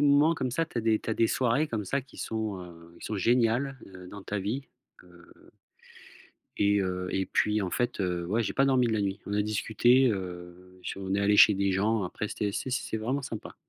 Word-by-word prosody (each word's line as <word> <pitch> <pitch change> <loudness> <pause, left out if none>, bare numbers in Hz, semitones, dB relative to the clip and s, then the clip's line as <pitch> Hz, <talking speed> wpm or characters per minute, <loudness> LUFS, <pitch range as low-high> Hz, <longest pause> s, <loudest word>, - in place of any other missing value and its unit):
moments 145 +3 +5
comme 130 -5 -2
ça, 165 +7 0
tu 155 - -12
as 115 - -2
des 110 -1 +3
tu - - -9
as 110 - 0
des 115 - +3
soirées 130 +5 +1
comme 110 -5 -3
ça 140 +6 -1
qui 130 - -17
sont, 110 -3 -3
heu 90 - -8 0.3
heu, - - -17
qui - - -7
sont 110 - -3
géniales, 120 +5 +1
heu, 90 -1 -12
dans 100 +1 -9
ta 105 +1 -3
vie, 120 +8 -3 0.4
heu 85 -1 -19 1.1
et 100 0 +3
heu 90 -1 -2
et 95 0 -1
puis, 105 +3 +1
en 95 - -2
fait, 120 0 -1
heu, 90 -2 -1
ouais, 110 +6 +1
j'ai - - -2
pas 135 - +3
dormi 130 -2 +3
de 115 - 0
la 110 - +1
nuit. 100 0 -2
On 100 - -4
a 105 - +2
discuté, 115 +5 +3
heu, 90 -2 -6
je - - -4
suis - - -7
on 95 0 -2
est 100 - +1
allé 105 +1 +3
chez 105 - +8
des 100 0 +1
gens 105 +3 +1
après, 105 +4 -4
c'était 100 -1 -2
c'est 130 - -3
c'est 125 -3 -2
vraiment 125 +6 -2
sympa. 115 -5 -7
105 Hz, 245 wpm, -28 LUFS, 95-120 Hz, 1.1 s, chez